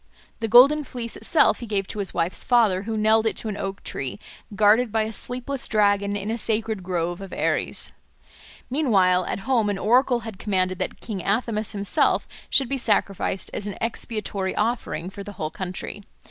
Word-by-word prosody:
The 225 - -1
golden 270 +7 +7
fleece 240 -4 -5
itself 320 - +3
he 235 - -7
gave 200 -2 -1
to 215 - -4
his 195 -3 +2
wife's 170 +1 -1
father, 220 -7 +3
who 220 +2 -3
nailed 220 +1 +3
it - - -2
to 220 - -3
an 205 - -4
oak 195 0 -5
tree, 130 -2 -5 0.4
guarded 215 +3 +4
by 220 0 +1
a 220 - -4
sleepless 250 +4 -2
dragon 205 -2 +2
in 205 +2 -3
a 230 - -2
sacred 220 -2 -1
grove 175 0 -2
of 195 -2 -8
Ares. - - -1 0.8
Meanwhile 195 - +3
at - - -3
home 235 -6 +2
an 200 - -1
oracle 245 +3 +3
had 220 -4 -8
commanded 185 -3 0
that - - -4
King 210 -5 -5
Athamas 215 0 0
himself 200 -1 +2 0.2
should 270 - +3
be 275 +1 -2
sacrificed 200 -4 0
as 205 - -4
an 205 - -5
expiatory 215 -4 -3
offering 210 -6 -2
for 200 - -8
the 205 - -8
whole 155 -4 -4
country. 185 +2 -6
210 Hz, 185 wpm, -24 LUFS, 195-230 Hz, 0.8 s, golden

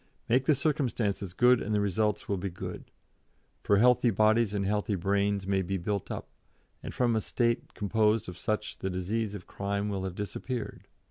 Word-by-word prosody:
Make 125 +3 +3
the 155 - +4
circumstances 120 - -1
good 125 0 +5
and 105 +1 -1
the - - +3
results 105 +1 0
will 100 -2 -1
be 100 +2 -3
good, 90 - -7 0.8
for 100 - +3
healthy 125 +2 +5
bodies 110 +1 +3
and 100 -1 -1
healthy 105 +1 0
brains 100 +1 0
may 95 0 +1
be 95 +1 -2
built 100 +2 -3
up, - - -5 0.5
and - - -6
from 120 -2 +1
a 110 - +1
State 120 +2 -1
composed 105 +1 +1
of 90 - -7
such 105 +5 -3
the 95 - -2
disease 100 +4 -2
of 90 - -8
crime 100 +1 -2
will 95 -2 -2
have 95 -2 -5
disappeared. 105 +3 -5
105 Hz, 185 wpm, -29 LUFS, 100-115 Hz, 0.8 s, good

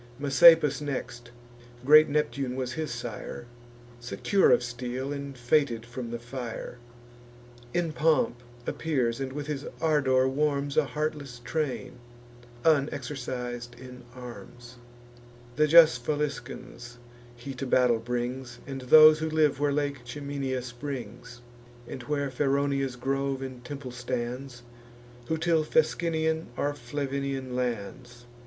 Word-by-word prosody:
Messapus 145 +2 +6
next, 120 -4 -5 0.6
(great 155 +2 +8
Neptune 140 -3 -1
was 130 -1 -3
his 155 +1 -3
sire,) 120 0 -6 0.5
Secure 160 +11 +2
of - - +4
steel, 125 +3 -4
and 140 -1 -6
fated 125 -2 +1
from 120 0 -6
the 120 - -4
fire, 120 0 -7 0.9
In 170 0 -1
pomp 155 -6 +2 0.2
appears, 130 -7 -1
and 135 -1 -3
with 145 +1 -5
his 145 -2 -4
ardour 135 -5 +3
warms 140 0 0
A 155 - +4
heartless 145 -1 -4
train, 130 -3 -3 0.7
unexercis'd 130 -5 -1
in 125 -1 -11
arms: 120 0 -11 0.8
The 150 +1 +3
just 155 -7 +7
Faliscans 125 -4 -4 0.4
he 120 +3 -7
to 135 +1 -5
battle 125 -2 +3
brings, 125 +1 -4
And 135 -1 -6
those 155 +4 +8
who 160 0 -2
live 155 -3 +2
where 145 0 +2
Lake 140 -2 -1
Ciminius 135 0 -4
springs; 120 -2 -7 0.5
And 130 - -7
where 140 -1 -1
Feronia's 140 -1 0
grove 135 +1 -2
and 130 -2 -8
temple 140 -3 -7
stands, 125 +1 -5 0.6
Who 160 - 0
till 160 -1 +2
Fescennian 160 0 +1
or 145 0 0
Flavinian 135 0 -4
lands. 120 0 -4
135 Hz, 120 wpm, -28 LUFS, 125-145 Hz, 0.9 s, great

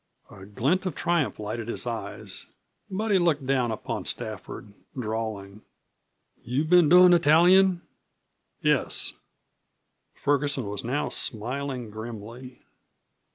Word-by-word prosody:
A 95 -1 -12
glint 145 - 0
of 170 - -4
triumph 170 -4 0
lighted 110 +2 -5
his 120 - -4
eyes, 110 -4 -6 0.4
but 215 +3 -2
he 195 - +4
looked 155 -6 +1
down 130 -2 +1
upon 110 - -4
Stafford, 105 -2 -6 0.3
drawling: 110 -3 -4 0.8
"You 125 +5 -1
been 170 -1 +5
doin' 180 +1 +8
the 175 - +6
tallyin'?" 175 +3 +5 0.8
"Yes." - - +2 1.0
Ferguson 145 -3 0
was 100 0 -5
now 130 +5 -1
smiling 125 +1 -3
grimly. 115 +3 -9
130 Hz, 110 wpm, -26 LUFS, 110-165 Hz, 1.0 s, doin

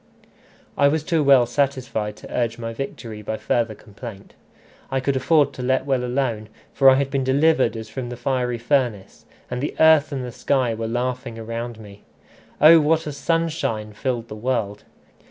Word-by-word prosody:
I 140 - +6
was 150 +1 0
too 160 -1 +1
well 135 -3 +6
satisfied 125 -5 -1
to - - -10
urge 115 -2 -1
my 115 -1 -5
victory 115 -3 -6
by 110 +1 -4
further 115 -2 -1
complaint. 105 -1 -11 0.6
I 135 - 0
could 135 +1 -1
afford 145 +1 +3
to - - -7
let 130 +1 0
well 135 -3 0
alone, 120 -4 -2 0.2
for 135 -1 +6
I 130 - +6
had 135 0 -1
been 135 -2 0
delivered 135 -1 +2
as 110 0 -7
from 125 +2 -6
the 120 - -7
fiery 125 -2 -1
furnace, 120 -5 -1 0.3
and 125 0 -3
the 145 - -3
earth 160 -1 +5
and 130 -3 -3
the 125 - -6
sky 125 -1 0
were 115 0 -4
laughing 120 0 -3
around 115 +1 -5
me. 105 -1 -13 0.6
Oh! 160 +2 +8
what 160 +1 +2
a 150 - -4
sunshine 140 -8 -2
filled 120 +1 -3
the 105 - -8
world! 110 -3 -2
125 Hz, 180 wpm, -22 LUFS, 115-140 Hz, 0.6 s, Oh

